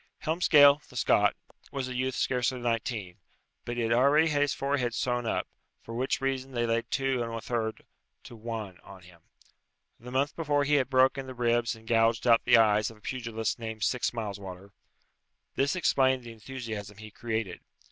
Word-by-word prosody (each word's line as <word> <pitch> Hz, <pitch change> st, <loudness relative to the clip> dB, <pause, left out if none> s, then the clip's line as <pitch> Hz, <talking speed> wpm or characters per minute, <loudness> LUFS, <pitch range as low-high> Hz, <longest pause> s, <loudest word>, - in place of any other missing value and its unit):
Helmsgail, 150 Hz, -3 st, +5 dB
the -, -, -16 dB
Scot, 110 Hz, -, +3 dB, 0.4 s
was 135 Hz, -2 st, -3 dB
a 130 Hz, -, -5 dB
youth 130 Hz, +1 st, -1 dB
scarcely 125 Hz, 0 st, 0 dB
nineteen, 115 Hz, -6 st, -3 dB, 0.5 s
but 120 Hz, 0 st, -4 dB
he 120 Hz, -, 0 dB
had 115 Hz, -, -1 dB
already 145 Hz, +6 st, +4 dB
had 145 Hz, -2 st, +1 dB
his 145 Hz, -1 st, +2 dB
forehead 135 Hz, -3 st, -1 dB
sewn 125 Hz, -2 st, -1 dB
up, -, -, -1 dB, 0.4 s
for 115 Hz, -, -9 dB
which 130 Hz, +3 st, -1 dB
reason 135 Hz, 0 st, -2 dB
they 120 Hz, -1 st, 0 dB
laid 115 Hz, 0 st, -1 dB
2 135 Hz, -2 st, 0 dB
1/3 115 Hz, -1 st, -3 dB, 0.4 s
to 120 Hz, -, -11 dB
1 110 Hz, -5 st, -6 dB
on 95 Hz, -2 st, -14 dB
him. 90 Hz, -1 st, -18 dB, 0.8 s
The 125 Hz, -, -10 dB
month 135 Hz, +4 st, 0 dB
before 145 Hz, -3 st, +1 dB
he 145 Hz, +1 st, 0 dB
had 130 Hz, -, -6 dB
broken 130 Hz, 0 st, +3 dB
the 130 Hz, -, -8 dB
ribs 120 Hz, -1 st, +1 dB
and 110 Hz, 0 st, -17 dB
gouged 115 Hz, +1 st, +2 dB
out 115 Hz, -1 st, +5 dB
the -, -, +6 dB
eyes 105 Hz, -1 st, +3 dB
of 115 Hz, -, -14 dB
a -, -, -24 dB
pugilist 115 Hz, -3 st, -3 dB
named 110 Hz, -2 st, -5 dB
Sixmileswater. 100 Hz, -4 st, -3 dB, 0.8 s
This 140 Hz, +6 st, +1 dB
explained 130 Hz, -7 st, +2 dB
the 120 Hz, -, -9 dB
enthusiasm 110 Hz, -3 st, -7 dB
he 110 Hz, 0 st, -10 dB
created. 110 Hz, -4 st, -4 dB
120 Hz, 175 wpm, -28 LUFS, 110-130 Hz, 0.8 s, the